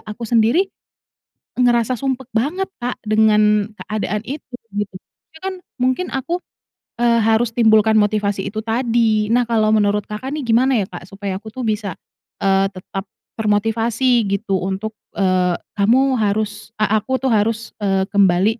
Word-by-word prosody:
aku 215 +2 -7
sendiri 230 - +3 1.0
ngerasa 240 0 +2
sumpek 265 -2 -3
banget, 320 +13 -1
Kak, 245 0 -4
dengan 210 -1 +3
keadaan 210 -1 -3
itu, 265 0 -7 0.2
gitu. 205 -1 -3
Itu 315 - -16
kan, 380 -1 -4 0.2
mungkin 255 +7 0
aku, 335 +7 -2 0.6
eee, 235 -1 +3
harus 225 +1 +2
timbulkan 220 -2 +4
motivasi 205 -2 0
itu 215 +1 -5
tadi. 225 -2 +1
Nah, 245 +1 +3
kalau 220 -2 +2
menurut 210 -1 +2
Kakak 255 +7 -5
nih, 305 - -3
gimana 250 +2 +3
ya, 205 -5 0
Kak, 175 -1 -9
supaya 195 0 -5
aku 220 +2 -11
tuh 260 - -5
bisa, 210 -4 -1 0.5
eee, 195 0 +3
tetap 190 +1 -6 0.3
termotivasi, 225 +3 +2
gitu, 195 -1 -1
untuk, 195 +3 -3 0.2
eee, 185 -2 +2 0.2
"Kamu 255 +7 +4
harus" 210 +1 -2
E - - +5
aku 220 +4 +1
tuh 260 - +2
harus, 225 +2 0
eee, 195 -2 +1
kembali 200 +3 +3
220 Hz, 150 wpm, -19 LUFS, 205-240 Hz, 1.0 s, E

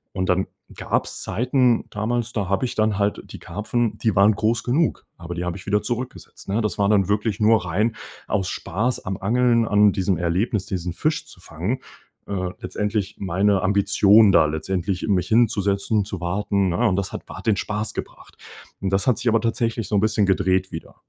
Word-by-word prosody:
Und 95 -1 -1
dann 95 +1 +2 0.3
gab's - - -2
Zeiten 125 +3 +1
damals, 120 +3 -2
da 105 -4 -2
habe 100 +5 0
ich 125 - -4
dann 110 -1 +1
halt 100 0 0
die - - -9
Karpfen, 105 +4 -2
die 110 -3 0
waren 100 +3 +5
groß 115 +2 +1
genug. 145 +6 0
Aber 85 0 -7
die 85 - -3
habe 90 +1 -3
ich 95 - -12
wieder 105 +1 +1
zurückgesetzt, 125 +2 -6
ne? 105 +4 +1
Das 105 -5 -2
war 100 - +3
dann 100 -3 +3
wirklich 105 0 0
nur 110 -2 +3
rein 105 +6 0 0.3
aus 95 - 0
Spaß 115 +8 -2
am 95 0 -3
Angeln, 115 +3 +2
an 105 0 +5
diesem 95 -2 0
Erlebnis, 90 +5 0
diesen 90 -2 -3
Fisch 155 - -1
zu - - -12
fangen. 95 +9 -3 0.5
Äh, 95 -2 -2
letztendlich 105 -1 -3
meine 95 +1 +1
Ambition 100 +1 +5
da 85 - +5
letztendlich 90 +4 -2
mich 90 -4 +1
hinzusetzen 105 -2 +2
und 100 - 0
zu 95 -3 -6
warten, 95 +2 0
ne? 90 - -1
Und 95 - +1
das 100 - -2
hat - - -6
wa - - -9
den 110 -3 +1
Spaß 105 +2 -3
gebracht. - - -8 0.5
Und 95 -1 -1
das 95 0 0
hat 125 - +3
sich - - -3
aber 115 0 +2
tatsächlich 115 0 -1
so 105 - -1
'n - - +4
bisschen 105 -1 +2
gedreht 95 -1 +1
wieder. 80 - -8
105 Hz, 200 wpm, -22 LUFS, 95-110 Hz, 0.5 s, waren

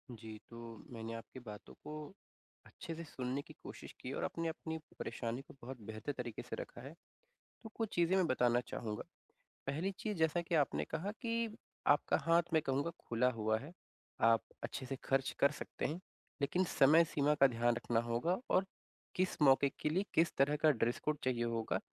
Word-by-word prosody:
जी, 110 -1 -8
तो 115 -2 -9
मैंने 115 0 -5
आपकी 115 +3 -8
बातों 105 -1 -9
को 150 - -6 0.7
अच्छे 165 - -7
से 170 - -6
सुनने 130 -3 -3
की - - -13
कोशिश - - -9
की - - -5
है - - -3
और - - -2
अपने 165 0 -1
अपनी 160 0 -4 0.2
परेशानी 120 +2 -3
को - - -12
बहुत 130 +2 -6
बेहतर 110 +5 -3
तरीक़े 120 -2 -4
से - - -2
रखा 120 - -7
है। 140 +4 -8 0.7
तो 225 - -7
कुछ 225 -2 -1
चीज़ें 175 +2 +4
मैं 185 -2 +4
बताना 125 -3 +3
चाहूँगा, 105 -2 -3 0.7
पहली 160 +8 0
चीज़ 210 -3 -2
जैसा 160 +1 +3
कि 170 0 -1
आपने 145 -3 +2
कहा 185 +6 -1
कि 230 -2 -1 0.3
आपका 145 - +5
हाथ 165 0 +5
मैं 160 - +5
कहूँगा 140 +5 +1 0.2
खुला 120 +2 +3
हुआ 110 0 +2
है, 145 +7 -9 0.5
आप 115 -2 +6 0.2
अच्छे 130 - -4
से 135 +1 -3
ख़र्च 135 0 +2
कर 140 - +6
सकते - - -5
हैं, 160 +4 -1 0.4
लेकिन 175 +6 +2 0.2
समय-सीमा 150 0 +6
का - - +10
ध्यान 120 -1 +2
रखना 115 -1 +1
होगा 120 +11 +1
और 185 +1 +4 0.5
किस 185 0 +1
मौके 140 0 +6
के - - +1
लिए 185 +6 +1
किस 165 +1 +5
तरह 140 +2 +4
का 155 - +8
ड्रेस 120 -1 +1
कोड 150 0 +2
चाहिए 125 -2 +1
होगा। 115 -1 0
140 Hz, 190 wpm, -36 LUFS, 120-165 Hz, 0.7 s, का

